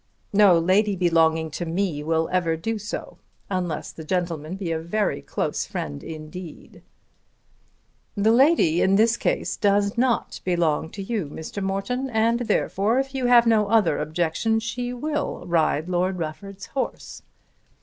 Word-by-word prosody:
"No 200 -4 +6
lady 195 +5 +2
belonging 160 -3 +2
to 175 - -4
me 170 -2 -1
will 160 +1 0
ever 170 -3 +1
do 220 +7 -3
so, 210 +3 -6 0.3
unless 180 -5 -2
the 160 - -10
gentleman 170 -1 -2
be 190 -4 -4
a 160 - -1
very 175 - -1
close - - -3
friend 70 -1 -5
indeed." 160 +2 -9 1.4
"The 210 +2 +3
lady 245 - +4
in 190 +1 +3
this 225 +3 +4
case - - -1
does 205 +1 +1
not 250 -1 0
belong 165 -3 0
to 200 - -5
you, 205 -5 -2
Mr. 160 +7 -7
Morton, 195 +8 -2
and 230 0 +2
therefore, 225 -1 +1
if 270 0 -1
you 260 -2 0
have 240 -1 +6
no 220 -3 +3
other 215 -8 +3
objection, 165 +8 0
she 245 +2 -4
will 295 - -3
ride 160 -2 +1
Lord 185 +1 0
Rufford's 190 +5 -6
horse. 265 - -5
190 Hz, 150 wpm, -24 LUFS, 165-225 Hz, 1.4 s, No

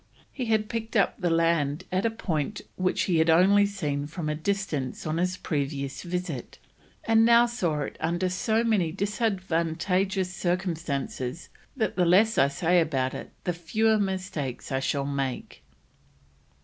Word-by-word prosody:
He 255 - -4
had 220 -2 +1
picked 230 +1 -5
up 200 - +2
the 175 - +1
land 165 -2 +1
at 185 +5 +1
a - - +1
point 190 -4 -3
which 185 0 0
he 175 -4 +1
had 160 +1 +3
only 195 +5 +5
seen 150 -8 -3
from 155 0 -4
a - - 0
distance 155 -5 -2
on 155 +1 -1
his 180 +2 0
previous 140 -2 -3
visit, 175 -7 -4 0.5
and 225 0 +4
"now 235 +1 +6
saw 175 -11 -1
it - - -5
under 175 +3 0
so 220 +5 +1
many 205 -8 +1
disadvantageous 190 -2 -1
circumstances, 165 -6 -3 0.3
that 220 -5 -1
the 180 - +3
less 210 +6 +4
I 135 - +6
say 175 +5 +2
about 135 -5 0
it, - - -7
the 180 - -1
fewer 215 +6 +1
mistakes 185 -10 -3
I 135 - +1
shall 140 +1 -1
make." 135 - -3
180 Hz, 155 wpm, -27 LUFS, 155-200 Hz, 0.5 s, now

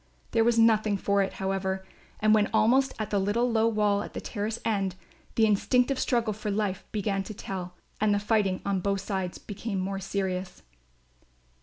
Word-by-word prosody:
There 225 - +3
was 235 0 +3
nothing 220 -2 +4
for 200 +1 +1
it, 195 - -1
however; 190 0 -2 0.3
and, 215 0 +4
when 210 -1 +3
almost 265 +4 +3
at 215 - -4
the 205 - +2
little 230 +5 +1
low 225 0 +3
wall 210 -2 +2
at - - -7
the - - -2
terrace 215 +1 -3
end, 195 -4 0 0.4
the 225 - +5
instinctive 250 +5 +2
struggle 235 -4 +1
for 210 +1 -5
life 200 -2 -1
began 200 -2 -1
to 210 +2 -7
tell 180 -2 -6 0.2
and 215 0 +3
the 205 - +3
fighting 205 -2 +1
on 200 -1 +1
both 195 +1 -1
sides 190 -3 -3
became 205 -1 -5
more 195 +1 -2
serious. 190 -1 -3
205 Hz, 180 wpm, -28 LUFS, 195-220 Hz, 0.4 s, the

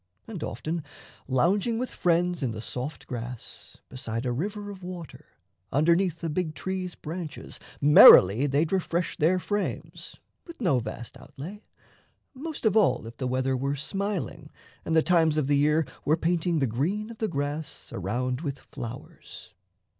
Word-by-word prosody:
And 200 -8 -7
often, 160 0 -3 0.4
lounging 195 - +2
with 255 +2 -3
friends 175 0 +1
in 130 - 0
the 110 - -6
soft 130 +6 -5
grass 120 -1 -7
Beside 120 -2 -4
a 125 - 0
river 205 - -3
of 195 -2 -11
water, 180 -3 -9 0.4
underneath 170 +3 +2
A - - 0
big 160 -1 -2
tree's 185 -1 -4
branches, 165 0 -6 0.2
merrily 140 - +9
they'd 145 +3 +1
refresh 175 -2 0
Their 165 +4 +3
frames, 205 +4 -4 0.3
with 335 - -11
no 170 - +2
vast 120 0 -7
outlay 185 +10 -9 0.7
most 295 0 -6
of 215 -2 +3
all 210 - +3
If 115 - -10
the 130 - -2
weather 130 +1 0
were 140 +2 -1
smiling 195 +5 -3 0.4
and 160 - 0
the 160 - +5
times 165 -3 +3
of 150 - +2
the 145 +1 +2
year 150 +2 +3 0.2
Were 155 +2 +2
painting 170 0 +1
the 140 - +2
green 180 - -1
of 225 - -12
the 220 - 0
grass 145 -1 -4
around 125 - -2
with 145 -4 -3
flowers. 120 -1 -10
160 Hz, 155 wpm, -27 LUFS, 135-185 Hz, 0.7 s, merrily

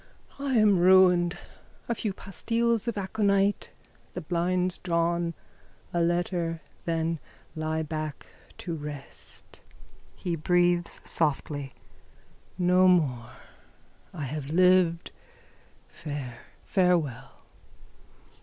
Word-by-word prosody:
_ 280 - -10
I 270 -2 0
am 210 -4 +5
ruined. 180 -1 +5 0.5
A 235 - 0
few 215 -2 -2
pastilles 230 +4 -1
of 235 - -2
aconite. 200 0 +1 0.4
The 180 - -4
blinds 180 +2 0
drawn. 170 -1 0 0.6
A 175 - +1
letter. 170 -1 0 0.3
Then 165 -1 -1 0.4
lie 160 0 -1
back 155 -1 -5 0.3
to 170 - -5
rest. 145 -3 -9 0.5
(He 175 -2 -3
breathes 175 +1 +1
softly.) 145 -3 -2 0.8
No 180 0 +4
more. 135 -10 +2 0.8
I 155 - -6
have 140 +1 -4
lived. 180 +1 +3 0.8
Fare. 140 -6 -7 0.3
Farewell. 165 - 0
175 Hz, 95 wpm, -27 LUFS, 155-185 Hz, 0.8 s, am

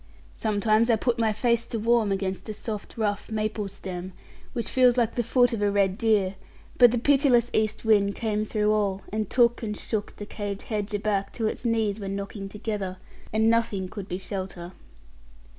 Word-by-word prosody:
Sometimes 215 +1 +2
I 230 - +5
put 235 +2 0
my 225 -1 +3
face 230 +2 +1
to 230 - -3
warm 225 -1 +2
against 190 -1 -2
the 215 - -6
soft, 215 0 -6
rough 205 -2 -1
maple 215 -1 -2
stem, 185 -1 -7 0.4
which 235 -3 -3
feels 250 -1 +4
like 235 -2 +2
the 240 - 0
foot 245 +1 +3
of 220 - -2
a 205 - +3
red 200 -2 +2
deer; 205 -4 +2 0.4
but 245 -2 +8
the 245 - 0
pitiless 255 -2 +3
east 220 +1 0
wind 200 -2 +3
came 215 -2 -1
through 215 0 +1
all, 200 -2 0
and 215 -2 -1
took 240 -1 +3
and 210 -2 -3
shook 215 -2 -3
the 205 - -7
caved 205 -1 -5
hedge 210 -2 -3
aback 205 -1 -1
till 225 - -3
its 230 - -4
knees 220 -3 +1
were 200 - -5
knocking 195 0 -5
together, 205 -3 -4 0.3
and 220 +1 +2
nothing 225 -5 +1
could 195 0 -7
be 180 - -3
shelter. 185 -2 -5
215 Hz, 190 wpm, -26 LUFS, 200-230 Hz, 0.4 s, but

